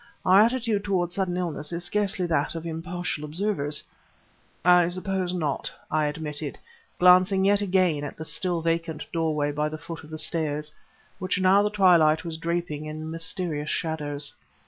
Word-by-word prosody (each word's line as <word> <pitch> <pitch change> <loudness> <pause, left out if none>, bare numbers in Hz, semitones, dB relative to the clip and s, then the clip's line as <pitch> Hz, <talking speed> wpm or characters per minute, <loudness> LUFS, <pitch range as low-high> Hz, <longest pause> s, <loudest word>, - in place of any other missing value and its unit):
Our 190 +2 +7
attitude 230 -3 +1
toward 180 -4 0
sudden 180 -1 -1
illness 155 -4 -3
is 170 0 -3
scarcely 200 -3 0
that 160 -2 0
of 165 0 -5
impartial 165 -1 -4
observers." 150 -2 0 0.8
"I 180 -1 +6
suppose 185 0 -2
not," 155 -6 -2 0.2
I 155 -1 +2
admitted, 150 -1 -4 0.4
glancing 185 +2 +5
yet 205 +1 +5
again 185 -6 +2
at 145 - -6
the 160 - -6
still 165 +2 -1
vacant 165 -2 -1
doorway 155 -3 0
by 150 +1 -1
the 155 - -6
foot 165 +1 -8
of 155 - -13
the 155 - -6
stairs, 150 -2 -1 0.5
which 185 +1 -1
now 190 +2 +5
the 210 - +1
twilight 175 -6 +4
was 165 -1 -4
draping 165 -2 -3
in 155 +1 -6
mysterious 165 -2 -3
shadows. 145 -3 -2
165 Hz, 160 wpm, -26 LUFS, 155-185 Hz, 0.8 s, Our